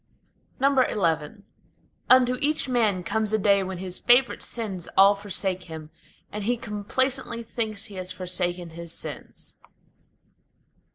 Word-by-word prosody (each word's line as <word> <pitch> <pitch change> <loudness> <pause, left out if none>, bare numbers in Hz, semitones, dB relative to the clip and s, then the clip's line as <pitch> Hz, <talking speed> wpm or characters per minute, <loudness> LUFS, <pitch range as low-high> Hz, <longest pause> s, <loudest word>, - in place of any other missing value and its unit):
XI 270 - +2 1.4
Unto 255 -1 +6
each 300 0 +2
man 220 -7 +1
comes 215 +3 -1
a - - +4
day 200 -1 +3
when 190 -1 -4
his 185 0 -7
favorite 245 +1 +3
sins 200 -7 -4
all 195 +1 +8
forsake 190 -2 -2
him, 160 -2 -9 0.4
And 210 0 -5
he 245 +2 +1
complacently 235 +3 -1
thinks 220 -3 -2
he 205 - -9
has 185 0 -4
forsaken 180 -2 -2
his 170 0 -7
sins. - - -8
205 Hz, 125 wpm, -25 LUFS, 185-235 Hz, 1.4 s, all